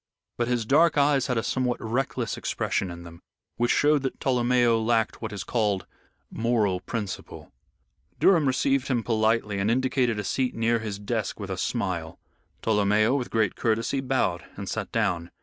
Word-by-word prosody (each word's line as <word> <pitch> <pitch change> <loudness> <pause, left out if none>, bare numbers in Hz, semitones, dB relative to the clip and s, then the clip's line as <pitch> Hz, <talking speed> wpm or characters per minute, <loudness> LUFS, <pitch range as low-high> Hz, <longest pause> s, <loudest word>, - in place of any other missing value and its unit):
But 120 - -1
his 120 -2 0
dark 155 +6 +4
eyes 140 -2 +3
had 125 - 0
a 115 - 0
somewhat 125 -2 -1
reckless 120 0 -2
expression 95 - -2
in 85 0 -8
them, 85 0 -12 0.4
which 120 0 +1
showed 150 0 +3
that 135 - -4
Tolomeo 120 -2 +2
lacked 115 -1 +1
what 110 - -4
is 100 -2 -5
called 105 -5 0 0.5
moral 110 -5 +1
principle. 100 +1 -6 0.7
Durham 165 -7 +4
received 135 +1 +1
him 120 -4 0
politely 110 -2 +1
and 100 +2 +1
indicated 125 -1 +1
a 105 - -2
seat 130 +2 -1
near 115 +1 +1
his 105 -3 -4
desk 100 0 -3
with - - -5
a - - -1
smile. 85 -4 -2 0.5
Tolomeo, 110 +2 +3
with 125 -3 -2
great 110 -4 +1
courtesy, 115 +4 0
bowed 125 -10 0
and - - -7
sat - - -4
down. 85 0 0
115 Hz, 165 wpm, -26 LUFS, 105-130 Hz, 0.7 s, dark